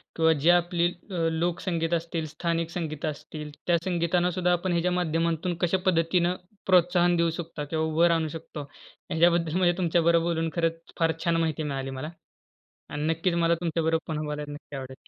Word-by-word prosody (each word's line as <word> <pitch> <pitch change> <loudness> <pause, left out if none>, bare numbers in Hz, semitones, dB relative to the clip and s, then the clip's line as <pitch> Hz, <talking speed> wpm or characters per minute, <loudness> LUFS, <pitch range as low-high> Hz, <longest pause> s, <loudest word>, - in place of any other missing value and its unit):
किंवा 160 0 +4
जे 155 +2 +2
आपली 175 0 +2 0.2
अ, 185 - -4 0.2
लोकसंगीत 170 0 -1
असतील, 165 -1 -1
स्थानिक 165 +2 -2
संगीत 160 -4 -4
असतील, 150 0 -6 0.2
त्या 175 -1 +4
संगीतांना 175 0 +1
सुद्धा 180 0 +1
आपण 175 +1 0
ह्याच्या 175 +1 +1
माध्यमातून 170 0 0
कशा 175 +1 +2
पद्धतीनं 175 0 +2 0.3
प्रोत्साहन 175 -1 +4
देऊ 170 0 +2
शकता 165 -3 -5
किंवा 160 +2 -1
उभं 160 +2 +3
राहू 165 -2 +2
शकतो 155 -1 -7
ह्याच्याबद्दल 165 +3 0
म्हणजे 175 -1 +3
तुमच्याबरोबर 170 -1 +3
बोलून 165 -1 0
खरंच 165 -1 0 0.2
फार 165 -1 +3
छान 170 -1 +2
माहिती 160 -1 -1
मिळाली 135 -2 -3
मला. 135 +4 -5 0.8
आणि 145 - -4
नक्कीच 165 +2 +1
मला 170 0 +3
तुमच्याबरोबर 165 -1 0
पुन्हा 155 -1 -3
बोलायला 150 0 -4
नक्की 145 -1 -9
आवडेल. 130 0 -9
165 Hz, 165 wpm, -27 LUFS, 160-175 Hz, 0.8 s, किंवा